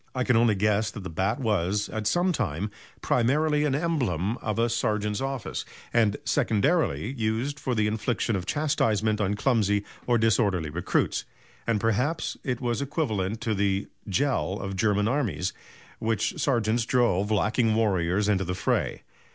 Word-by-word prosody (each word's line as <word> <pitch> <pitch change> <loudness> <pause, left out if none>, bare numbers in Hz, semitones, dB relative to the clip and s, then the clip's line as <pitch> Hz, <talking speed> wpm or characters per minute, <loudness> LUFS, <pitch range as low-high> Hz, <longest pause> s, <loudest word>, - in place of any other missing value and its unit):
I 130 - +1
can 125 -1 +2
only 115 -2 +4
guess 105 +2 +1
that 105 -2 -8
the 95 - -6
bat 95 - 0
was, 105 -3 0
at 110 -1 -3
some 175 - +2
time, 105 - -2 0.3
primarily, 150 +5 +2
an 140 -2 +1
emblem 120 - 0
of 110 -1 -3
a 115 +1 +3
sergeant's 105 -2 -1
office, 135 -3 -3 0.3
and, 110 -3 +3
secondarily, 125 - +1
used 120 +4 -1
for 130 -2 -1
the 105 -1 +2
infliction 110 +1 0
of 90 -1 -4
chastisement 110 -8 +1
on 100 0 +1
clumsy 105 -4 +2 0.2
or 120 -1 +4
disorderly 100 -8 +2
recruits; 85 +3 0 0.4
and 115 -3 +2
perhaps 125 +10 0
it 125 -3 -2
was 120 0 -1
equivalent 110 - -2
to 110 - 0
the 100 -1 0 0.2
Prügel 105 -2 0
of 95 -1 -4
German 105 0 +2
armies, 120 -8 -1 0.5
with 110 - -4
which 165 - -2
sergeants 115 -4 +1
drove 115 -5 +2
lagging 110 +1 +2
warriors 100 -2 +1
into 100 -2 +2
the 90 0 -3
fray. - - -1
110 Hz, 160 wpm, -26 LUFS, 100-125 Hz, 0.5 s, only